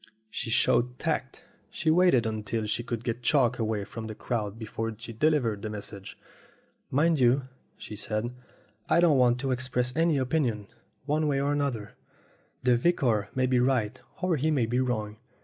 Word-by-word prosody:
She 115 Hz, -, -4 dB
showed 120 Hz, +2 st, +2 dB
tact. -, -, -3 dB, 0.3 s
She 160 Hz, -1 st, 0 dB
waited 165 Hz, -8 st, +4 dB
until 110 Hz, 0 st, -2 dB
she 105 Hz, +3 st, -1 dB
could 120 Hz, -1 st, -4 dB
get 120 Hz, 0 st, -3 dB
Chalk 125 Hz, -1 st, +2 dB
away 110 Hz, -2 st, -1 dB
from 110 Hz, +1 st, -7 dB
the 110 Hz, -, -6 dB
crowd 105 Hz, -2 st, -3 dB
before 115 Hz, 0 st, -4 dB
she 115 Hz, +1 st, -8 dB
delivered 115 Hz, -6 st, +1 dB
her 110 Hz, -, -3 dB
message. 100 Hz, -2 st, -8 dB, 0.7 s
"Mind 155 Hz, +3 st, +2 dB
you," 130 Hz, +2 st, +4 dB, 0.3 s
she 105 Hz, -, -8 dB
said, 110 Hz, +3 st, -3 dB, 0.6 s
"I -, -, +4 dB
don't 165 Hz, -6 st, +5 dB
want 125 Hz, 0 st, +4 dB
to 135 Hz, -1 st, -1 dB
express 125 Hz, -1 st, -1 dB
any 165 Hz, -2 st, +3 dB
opinion 125 Hz, -6 st, 0 dB, 0.4 s
one 150 Hz, +1 st, +1 dB
way 140 Hz, -2 st, +1 dB
or 140 Hz, +1 st, +1 dB
the 145 Hz, -, +1 dB
other. 115 Hz, -7 st, -3 dB, 0.7 s
The 125 Hz, -1 st, +4 dB
vicar 120 Hz, -8 st, +1 dB
may 130 Hz, 0 st, +2 dB
be 125 Hz, -1 st, +2 dB
right 125 Hz, -2 st, +1 dB, 0.2 s
or 180 Hz, -3 st, +2 dB
he 150 Hz, +4 st, +1 dB
may 140 Hz, -7 st, +2 dB
be 120 Hz, +3 st, 0 dB
wrong. 110 Hz, -4 st, -1 dB
125 Hz, 175 wpm, -28 LUFS, 110-140 Hz, 0.7 s, don't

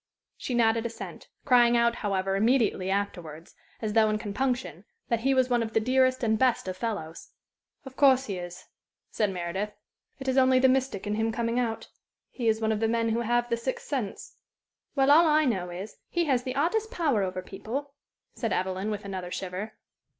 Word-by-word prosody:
She 250 Hz, -, -4 dB
nodded 230 Hz, 0 st, +2 dB
assent; 230 Hz, -, -9 dB, 0.2 s
crying 240 Hz, -3 st, +5 dB
out, 235 Hz, 0 st, +2 dB
however, 195 Hz, -2 st, -1 dB
immediately 220 Hz, -3 st, +2 dB
afterwards, 175 Hz, -5 st, -4 dB, 0.3 s
as 215 Hz, -1 st, -1 dB
though 220 Hz, -1 st, +4 dB
in 215 Hz, -, +1 dB
compunction, 245 Hz, +4 st, -2 dB, 0.3 s
that 235 Hz, -, +1 dB
he 270 Hz, +3 st, +1 dB
was 260 Hz, -1 st, +3 dB
one 245 Hz, -2 st, +1 dB
of 220 Hz, -1 st, -4 dB
the -, -, +4 dB
dearest 255 Hz, +2 st, +2 dB
and 220 Hz, -1 st, +2 dB
best 255 Hz, -6 st, +2 dB
of 185 Hz, -, -3 dB
fellows. 185 Hz, -6 st, -5 dB, 0.6 s
"Of 265 Hz, -1 st, -10 dB
course 265 Hz, -2 st, +5 dB
he 195 Hz, -5 st, -4 dB
is," 175 Hz, +1 st, -8 dB, 0.5 s
said 210 Hz, -2 st, +1 dB
Meredith. 190 Hz, +3 st, -3 dB, 0.4 s
"It 270 Hz, -, -8 dB
is 260 Hz, 0 st, +3 dB
only 260 Hz, 0 st, +5 dB
the 260 Hz, +1 st, +5 dB
mystic 260 Hz, -6 st, 0 dB
in 205 Hz, -, -1 dB
him 225 Hz, +1 st, 0 dB
coming 230 Hz, +2 st, -1 dB
out. 230 Hz, -2 st, -3 dB, 0.4 s
He 240 Hz, -3 st, -3 dB
is 220 Hz, 0 st, +3 dB
one 220 Hz, 0 st, 0 dB
of 215 Hz, -, 0 dB
the 225 Hz, -, +1 dB
men 230 Hz, 0 st, +1 dB
who 230 Hz, +1 st, 0 dB
have 240 Hz, +1 st, +1 dB
the 235 Hz, -, +2 dB
sixth 255 Hz, +3 st, -4 dB
sense." 255 Hz, -9 st, -4 dB, 0.6 s
"Well, 270 Hz, 0 st, +4 dB
all 325 Hz, +3 st, +7 dB
I 310 Hz, 0 st, +4 dB
know 190 Hz, -8 st, -1 dB
is, 190 Hz, +4 st, -7 dB
he 345 Hz, -1 st, 0 dB
has 260 Hz, -5 st, +2 dB
the 255 Hz, +1 st, -5 dB
oddest 415 Hz, +10 st, 0 dB
power 310 Hz, -, +1 dB
over 185 Hz, -1 st, -3 dB
people," 265 Hz, +10 st, -6 dB, 0.4 s
said 230 Hz, -4 st, -3 dB
Evelyn, 190 Hz, +2 st, -1 dB
with 210 Hz, -1 st, -4 dB
another 185 Hz, -2 st, -5 dB
shiver. 190 Hz, +4 st, -5 dB
230 Hz, 195 wpm, -27 LUFS, 200-255 Hz, 0.6 s, all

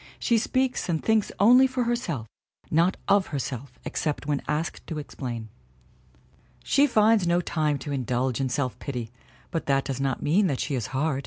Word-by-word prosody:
She 235 Hz, -2 st, +2 dB
speaks 255 Hz, -1 st, 0 dB
and 160 Hz, -2 st, 0 dB
thinks 220 Hz, -2 st, +2 dB
only 250 Hz, +6 st, +7 dB
for 255 Hz, -1 st, -1 dB
herself 230 Hz, -, -2 dB, 0.4 s
not 170 Hz, +4 st, +3 dB
of 200 Hz, -1 st, +4 dB
herself 135 Hz, -2 st, -5 dB
except 150 Hz, -2 st, -2 dB
when 145 Hz, -2 st, 0 dB
asked 155 Hz, +3 st, -3 dB
to 160 Hz, -, -4 dB
explain. 120 Hz, -6 st, -6 dB, 1.1 s
She 285 Hz, +1 st, +4 dB
finds 220 Hz, -5 st, +4 dB
no 170 Hz, +1 st, +3 dB
time 155 Hz, -4 st, 0 dB
to 145 Hz, +2 st, -6 dB
indulge 130 Hz, -1 st, -1 dB
in 130 Hz, -, 0 dB
self 130 Hz, -2 st, -2 dB
pity, 125 Hz, -5 st, -5 dB, 0.4 s
but 165 Hz, -, -3 dB
that 135 Hz, -1 st, +2 dB
does 135 Hz, -1 st, -3 dB
not 135 Hz, -2 st, -1 dB
mean 185 Hz, +7 st, +3 dB
that 135 Hz, -6 st, -1 dB
she -, -, -2 dB
is 125 Hz, -5 st, -1 dB
hard. 135 Hz, +1 st, -1 dB
150 Hz, 175 wpm, -26 LUFS, 135-205 Hz, 1.1 s, only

